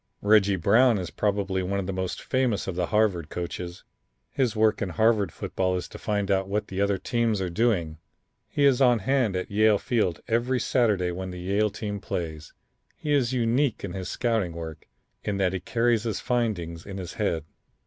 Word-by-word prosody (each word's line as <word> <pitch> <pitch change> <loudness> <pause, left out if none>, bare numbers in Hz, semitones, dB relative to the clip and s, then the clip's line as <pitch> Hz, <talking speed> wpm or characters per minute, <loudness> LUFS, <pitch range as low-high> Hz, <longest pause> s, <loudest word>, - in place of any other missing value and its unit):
Reggie 100 -1 +5
Brown 110 +7 +4
is 90 -3 -4
probably 100 -2 0
one 100 +2 -1
of 95 - -3
the 95 - -3
most 95 -1 -3
famous 130 -5 0
of 95 - -4
the 90 -1 0
Harvard 100 -7 +1
coaches. 90 0 -5 0.5
His 130 -6 0
work 110 0 +2
in 100 - -1
Harvard 110 -1 +2
football 95 +3 -1
is 90 -4 -3
to - - -10
find 105 -1 -1
out 95 0 +1
what 105 +1 -2
the 95 +1 -2
other 100 -1 +2
teams 115 0 0
are 90 -2 -2
doing. 85 -7 0 0.5
He 145 - +1
is 135 -2 +4
on 125 -2 +5
hand 120 -2 +1
at 90 - -3
Yale 105 +1 +4
Field 100 -9 0
every 120 +3 +1
Saturday 105 -10 +1
when 95 +1 -5
the 90 -1 -7
Yale 100 +4 +1
team 105 0 -5
plays. 80 -5 -5 0.4
He 150 - -2
is 130 -4 +2
unique 125 +1 +1
in - - -4
his 95 -2 -5
scouting 110 -8 0
work, 80 -2 -8 0.4
in 100 - -2
that 95 -2 +1
he 95 - -1
carries 115 +4 +1
his 110 -3 -2
findings 95 -9 -1
in 100 -1 -7
his 90 -3 -6
head. 85 -7 0
100 Hz, 195 wpm, -26 LUFS, 90-115 Hz, 0.5 s, Reggie